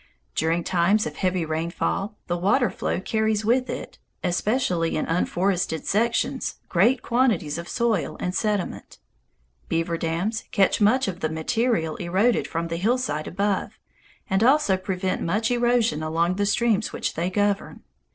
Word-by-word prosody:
During 165 +2 0
times 190 +5 +2
of 150 - -6
heavy 185 -3 0
rainfall, 170 +6 -2
the 175 - -1
water 200 +5 +2
flow - - -2
carries 220 +1 0
with 250 +3 +2
it, - - -6 0.2
especially 180 -2 0
in - - -1
unforested 180 0 0
sections, 235 +4 0
great 230 +9 +3
quantities 220 - +1
of 170 - -8
soil 225 -8 0
and 180 - -2
sediment. 205 -1 -2 0.7
Beaver 165 0 -1
dams 175 +7 -2
catch 195 +2 +2
much 240 +5 +4
of 180 -2 -4
the 155 - -1
material 160 +1 0
eroded 190 +7 +1
from 165 0 -3
the 165 - -2
hillsides 195 -7 0
above, 200 +1 -1 0.5
and 190 +3 +1
also 265 -5 +4
prevent 185 0 -2
much 210 +7 0
erosion 240 -9 +2
along 165 +3 0
the 205 0 +1
streams 220 -1 +1
which - - -3
they 170 +3 -1
govern. 205 +1 -1
190 Hz, 145 wpm, -24 LUFS, 170-220 Hz, 0.7 s, much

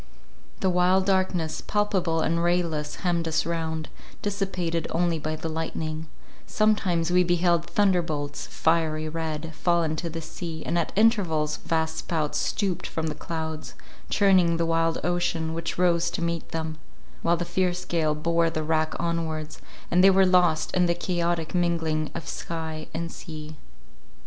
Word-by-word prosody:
The 190 - +3
while 180 +1 +4
darkness, 185 -4 0
palpable 190 -6 0
and 170 +1 +1
rayless, 170 -4 0
hemmed 170 -2 +1
us 160 +1 +1
round, 160 -1 -2 0.4
dissipated 185 -5 -1
only 170 -1 +1
by 155 +1 -2
the 160 - -5
lightning; 160 0 -3 0.4
sometimes 185 -6 +2
we 180 0 +5
beheld 175 -1 +2
thunderbolts, 165 -8 0
fiery 160 -1 +1
red, 160 0 -4
fall 170 +1 +2
into 160 +2 -2
the 165 +1 -5
sea, 160 0 -6
and 165 - -1
at 170 - -1
intervals 185 -9 +3
vast 160 -1 -1
spouts 155 -4 -1
stooped 190 -4 -1
from 160 - -3
the - - -2
clouds, 160 0 -5 0.3
churning 185 -5 +4
the 165 - +1
wild 165 0 +1
ocean, 175 -2 0
which 165 0 -3
rose 170 -1 +3
to 170 - -3
meet 170 -1 -2
them; 160 -1 -4 0.4
while 170 +1 +2
the 175 - -2
fierce 180 +1 0
gale 155 -3 +1
bore 165 +2 +2
the 155 -1 -3
rack 155 0 0
onwards, 160 -2 -2 0.3
and 180 +1 +5
they 195 - +9
were 190 0 +5
lost 180 -3 +3
in 180 -1 +4
the 170 - +2
chaotic 170 -2 -1
mingling 165 -3 0
of 165 -2 -5
sky 160 -2 -5
and 165 +1 -4
sea. 155 -1 -8
165 Hz, 155 wpm, -26 LUFS, 160-175 Hz, 0.4 s, they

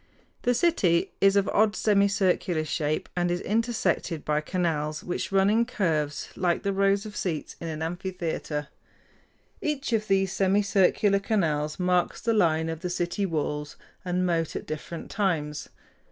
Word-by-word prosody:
The 245 0 +2
city 220 - +2
is 195 0 +5
of 200 -1 +3
odd, 210 0 +3
semicircular 200 -5 +2
shape, 155 0 -1
and 175 -1 +1
is 175 0 0
intersected 220 -7 -1
by 150 0 +1
canals, 155 -3 -1
which 180 - -3
run 195 0 +4
in 220 +3 +4
curves 155 - -1
like 175 -2 0
the 200 - 0
rows 195 +1 +2
of 210 -1 -8
seats 165 -5 -3
in 165 - -4
an 160 -1 -4
amphitheater. 165 -4 -3 0.9
Each 290 -4 -2
of 215 -1 +1
these 195 -1 +2
semicircular 200 0 +3
canals 155 -8 0
marks 180 -1 +1
the 230 - 0
line 160 -6 +2
of 160 -1 -4
the 180 - -4
city 175 +3 -1
walls 150 -2 -3 0.3
and 180 0 0
moat 165 -3 0
at - - -4
different 155 +2 -6
times. 155 -8 -1
180 Hz, 155 wpm, -27 LUFS, 160-200 Hz, 0.9 s, is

